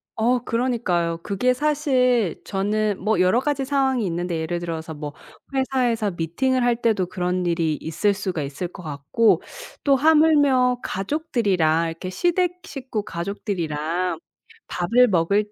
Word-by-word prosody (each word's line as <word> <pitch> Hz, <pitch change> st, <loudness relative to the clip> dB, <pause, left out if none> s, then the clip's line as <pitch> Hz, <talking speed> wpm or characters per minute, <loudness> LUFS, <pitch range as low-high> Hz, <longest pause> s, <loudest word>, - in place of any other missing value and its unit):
어 245 Hz, +2 st, +1 dB
그러니까요. 230 Hz, -10 st, 0 dB
그게 250 Hz, +6 st, +1 dB
사실 255 Hz, -, +1 dB
저는 205 Hz, +1 st, -1 dB
뭐 215 Hz, +2 st, +1 dB
여러 185 Hz, +6 st, +4 dB
가지 275 Hz, 0 st, -1 dB
상황이 265 Hz, -4 st, +1 dB
있는데 175 Hz, -1 st, -2 dB
예를 170 Hz, +2 st, -2 dB
들어서 165 Hz, -2 st, -5 dB
뭐 150 Hz, -1 st, -6 dB, 0.4 s
회사에서 245 Hz, -5 st, +1 dB
미팅을 240 Hz, -, 0 dB
할 240 Hz, -1 st, +3 dB
때도 220 Hz, -6 st, 0 dB
그런 180 Hz, -1 st, -2 dB
일이 165 Hz, -2 st, +1 dB
있을 175 Hz, +6 st, 0 dB
수가 190 Hz, -6 st, -3 dB
있을 140 Hz, +6 st, -4 dB
것 180 Hz, +1 st, -12 dB
같고 155 Hz, +9 st, +1 dB, 0.4 s
또 280 Hz, -1 st, +4 dB
하물며 285 Hz, -4 st, +4 dB
가족들이랑 195 Hz, -, 0 dB
이렇게 165 Hz, +3 st, -6 dB
시댁 355 Hz, -, 0 dB
식구 255 Hz, -9 st, -5 dB
가족들이랑 170 Hz, -3 st, -3 dB, 0.5 s
밥을 235 Hz, +8 st, +3 dB
먹을 200 Hz, +2 st, +1 dB
205 Hz, 300 characters per minute, -23 LUFS, 175-255 Hz, 0.5 s, 여러